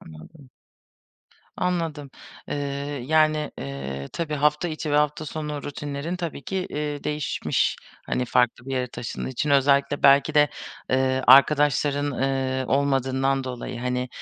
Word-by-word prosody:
Anladım. 125 - -14 1.1
Anladım. 165 -6 -2 0.4
Eee, - - -2 0.5
yani, 155 -1 +2
eee, 70 0 -6
tabii 155 -3 -3
hafta 150 +4 +1
içi 155 -1 -4
ve 145 - +2
hafta 150 +1 +1
sonu 150 -1 -5
rutinlerin 145 +4 -4
tabii 165 -5 -5
ki, 190 - -4
eee, 150 -1 -4
değişmiş. 150 -1 0 0.3
Hani, 125 - -1
farklı 125 0 +1
bir - - -6
yere 125 -1 0
taşındığın 120 -1 -6
için, 145 +3 -2
özellikle 140 +1 +3
belki 140 +2 +5
de, 150 -1 +5 0.4
eee, 130 0 +1
arkadaşların, 145 +1 +5
ııı, 130 -1 -1
olmadığından 135 -1 +1
dolayı, 125 -1 -6
hani, 125 0 -2
140 Hz, 130 wpm, -24 LUFS, 130-150 Hz, 1.1 s, belki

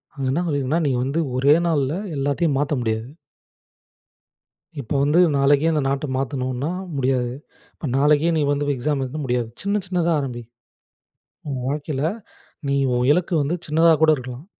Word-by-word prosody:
அங்க 135 -2 -3
என்ன 170 +6 0
சொல்லியிருக்குன்னா, 145 +2 0
நீங்க 125 -2 +1
வந்து 150 +5 0 0.2
ஒரே 140 +3 +5
நாள்ல 145 -3 +1 0.2
எல்லாத்தையும் 140 +1 0
மாத்த 145 0 0
முடியாது. 110 +1 -2 1.7
இப்போ 120 - -4
வந்து 150 +5 +4 0.2
நாளைக்கே 140 +3 +3
அந்த 150 - +1
நாட்டை 140 +2 -1
மாத்தணுன்னா 130 +1 -2 0.3
முடியாது. 130 -2 0 0.4
இப்போ 155 - -7
நாளைக்கே 150 +4 +3
நீ 155 - +2
வந்து 145 0 0
எக்ஸாம் 140 +3 -1
எழுதனுனா 140 +3 -4
முடியாது. 120 -2 -1
சின்ன 200 +1 0
சின்னதா 175 -2 0
ஆரம்பி. 125 -3 -5 1.1
உன் 130 -3 -3
வாழ்க்கையில 145 -1 -3 0.7
நீ 140 - +1 0.2
உன் 125 +1 +1
இலக்கு 180 +2 0
வந்து 155 +5 -1
சின்னதா 165 +2 +4
கூட 160 - +6
இருக்கலாம். 130 +3 -8
140 Hz, 150 wpm, -22 LUFS, 130-155 Hz, 1.7 s, கூட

